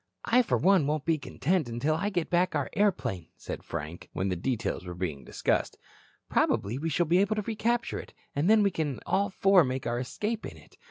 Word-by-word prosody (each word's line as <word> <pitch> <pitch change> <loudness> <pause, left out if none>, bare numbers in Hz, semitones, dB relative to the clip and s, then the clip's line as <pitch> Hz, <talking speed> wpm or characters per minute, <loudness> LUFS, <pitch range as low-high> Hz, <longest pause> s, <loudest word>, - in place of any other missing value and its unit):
"I, 245 +2 +5
for 240 - +1
one, 185 -6 +4
won't 150 -1 -1
be 165 -2 +2
content 140 +3 -1
until 120 +7 0
I 175 +6 0
get 175 -5 -2
back 180 +1 +2
our - - -1
airplane," 125 - 0
said - - -6
Frank, 85 +1 -6
when 95 +1 -1
the 90 - 0
details 115 +2 -2
were 90 -1 -7
being 80 -7 -4
discussed. - - -1 0.5
"Probably 115 +7 +1
we 165 +2 -1
shall 175 +3 +1
be 170 +3 +3
able 200 +2 +2
to 215 - -1
recapture 230 +2 -1
it, - - -10 0.2
and 150 +7 +2
then 220 -1 +6
we 200 - +3
can 150 -7 -2
all 200 +1 +1
four 195 -1 +5
make 130 -1 -3
our 120 +1 -1
escape 210 - -3
in - - -7
it. - - -18
160 Hz, 215 wpm, -29 LUFS, 120-195 Hz, 0.5 s, then